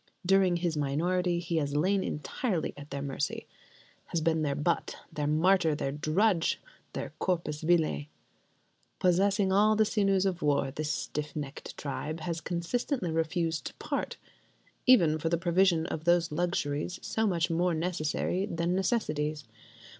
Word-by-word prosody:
During 190 -1 +4
his 170 -1 -1
minority 170 +5 0
he 170 -1 -2
has 145 -2 -1
lain 190 +6 +2
entirely 175 - -2
at 145 0 -11
their 140 0 -4
mercy: 140 +1 -3 0.6
has 170 - -1
been 160 0 +1
their 145 -2 0
butt, 170 +4 0 0.2
their 150 -1 -1
martyr, 165 +1 +3
their 135 -2 -2
drudge, 165 +5 +1 0.3
their - - -5
corpus 165 -5 -1
vile. 160 -3 +2 0.9
Possessing 195 +2 +2
all 210 +3 +4
the 215 0 +4
sinews 195 -3 +2
of 185 -2 -1
war, 140 -2 +1
this 150 +2 -3
stiff 150 0 -4
necked 145 -2 -6
tribe 155 +3 -4
has 165 +1 -3
consistently 180 - -2
refused 165 0 0
to - - -5
"part": - - -3 0.7
even 170 -11 +6
for 165 - -1
the 170 - +2
provision 175 -1 +3
of 160 -2 -5
those 175 -1 +3
luxuries 170 0 -1
so 220 0 0
much 170 -4 +1
more 170 +1 +1
necessary 175 +3 -1
than 170 -1 -1
necessities. 155 -7 0
170 Hz, 145 wpm, -30 LUFS, 150-185 Hz, 0.9 s, even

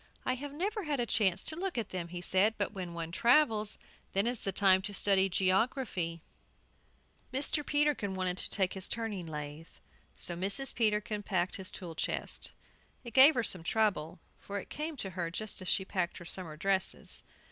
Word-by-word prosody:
"I 255 - +2
have 280 +3 -6
never 400 +9 -2
had 290 -3 -1
a 240 - +1
chance 195 -5 +2
to 310 - -4
look 365 -2 -3
at 230 - -2
them," 180 -2 -4
he 175 +1 -6
said; 195 +5 +3
"but 205 - -1
when 180 -4 -6
one 165 -1 -4
travels, 225 - +3 0.4
then 195 +2 +2
is 240 -1 -1
the 195 - -2
time 190 -1 +4
to 200 +1 -5
study 195 -1 +3
geography." 185 - 0 1.1
Mr. 285 +3 +2
Peterkin 290 -10 +1
wanted 185 -1 -1
to - - 0
take 190 -3 0
his 190 -1 -2
turning 215 -7 -2
lathe. 150 +1 -6 0.5
So 175 - +2
Mrs. 200 +10 0
Peterkin 210 -1 +1
packed 185 -3 -1
his 190 -1 -3
tool 175 -3 -7
chest. - - -3 0.5
It 235 -3 -9
gave 275 +4 +9
her 235 - +1
some 185 -5 +2
trouble, 170 -5 0 0.2
for 200 - -6
it - - -10
came 305 0 -4
to 195 -6 -3
her 175 -2 -3
just 210 +4 -2
as 185 - -6
she - - +3
had - - -19
packed 180 -2 -1
her 175 - -10
summer 170 -3 -2
dresses. 190 +3 0
195 Hz, 190 wpm, -32 LUFS, 180-235 Hz, 1.1 s, gave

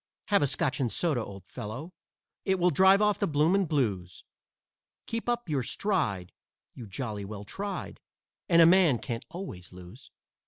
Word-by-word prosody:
Have 200 -1 +4
a 145 - +3
Scotch 145 +1 -1
and 125 -4 0
soda, 150 -9 +1
old 100 -3 -10
fellow 125 - -7 0.5
It 190 0 +1
will 180 0 +3
drive 190 +6 +5
off 210 -1 +2
the 200 - +1
blooming 165 +6 +2
blues; 100 - -1 0.8
Keep 230 +1 -3
up 240 -3 -1
your 145 -4 0
stride, 125 - -1 0.4
you 120 -4 -9
jolly 105 0 -5
well 100 0 -7
tried, 200 - -5 0.5
And 170 -1 +7
a - - +8
man 170 -6 +5
can't 115 0 -5
always 165 - -8
lose." 90 +8 -13
145 Hz, 160 wpm, -28 LUFS, -, 0.8 s, a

